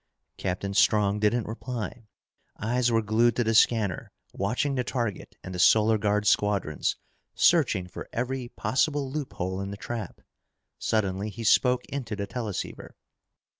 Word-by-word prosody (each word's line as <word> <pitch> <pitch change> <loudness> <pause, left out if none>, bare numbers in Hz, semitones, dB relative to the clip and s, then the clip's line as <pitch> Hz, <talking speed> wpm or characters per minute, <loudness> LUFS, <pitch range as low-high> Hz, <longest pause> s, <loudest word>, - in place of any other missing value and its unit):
Captain 95 +1 -3
Strong 105 0 +3
didn't 105 +2 +1
reply. 115 0 -5 0.5
Eyes 120 +3 +1
were 115 -1 +2
glued 110 +2 +3
to 120 - +1
the 115 0 +1
scanner, 110 0 +2 0.2
watching 125 +8 -1
the 125 -2 0
target 120 -6 -3
and 95 - -7
the 90 - -5
Solar 110 +3 +5
Guard 105 0 +1
squadrons, 100 -7 +1 0.4
searching 135 - +3
for 90 - -9
every 125 +1 -3
possible 140 +1 0
loophole 95 -10 -3
in 100 - -4
the 100 - -6
trap. 115 +2 -6 0.6
Suddenly 100 -1 0
he 115 +3 -7
spoke 125 +3 +3
into 125 -6 -4
the 100 -1 -3
teleceiver. 110 -5 -5
110 Hz, 140 wpm, -27 LUFS, 100-125 Hz, 0.6 s, Solar